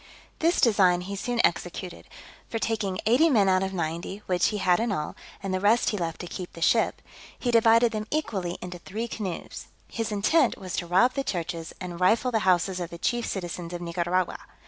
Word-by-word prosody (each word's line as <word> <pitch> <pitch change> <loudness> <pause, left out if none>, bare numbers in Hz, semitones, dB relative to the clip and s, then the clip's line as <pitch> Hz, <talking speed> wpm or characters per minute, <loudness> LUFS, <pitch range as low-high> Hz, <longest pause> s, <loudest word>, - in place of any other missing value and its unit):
This 335 +2 +2
design 190 -7 +4
he 200 +2 -5
soon 240 +4 -2
executed; 175 +1 -3 0.4
for 225 - -2
taking 215 -4 -1
eighty 255 +10 +5
men 215 -9 +4
out 185 0 +3
of 190 0 -1
ninety, 170 +3 -4
which 180 -1 +2
he 210 - -1
had 180 -3 +3
in 230 -1 0
all 150 -6 -3 0.3
and 195 -1 -2
the 185 - 0
rest 210 +5 +3
he 210 - -2
left 165 -2 -3
to - - -6
keep 175 +1 -7
the - - -10
ship 225 +6 +2 0.3
he 245 - -1
divided 230 0 +5
them 215 -1 -4
equally 195 - -2
into 180 -1 -7
three 220 +7 -5
canoes. 195 -6 -6 0.2
His 225 -1 -3
intent 230 +7 +2
was 185 -3 -5
to 175 - -2
rob 190 +9 +4
the 275 - -1
churches, 170 -5 -4
and 175 -2 -6
rifle 225 +7 +3
the 225 - +2
houses 180 +1 +2
of 175 -2 -4
the 170 - -8
chief 240 +6 -1
citizens 175 -2 -4
of 175 - -5
Nicaragua. 175 +1 -1
190 Hz, 205 wpm, -26 LUFS, 175-225 Hz, 0.4 s, eighty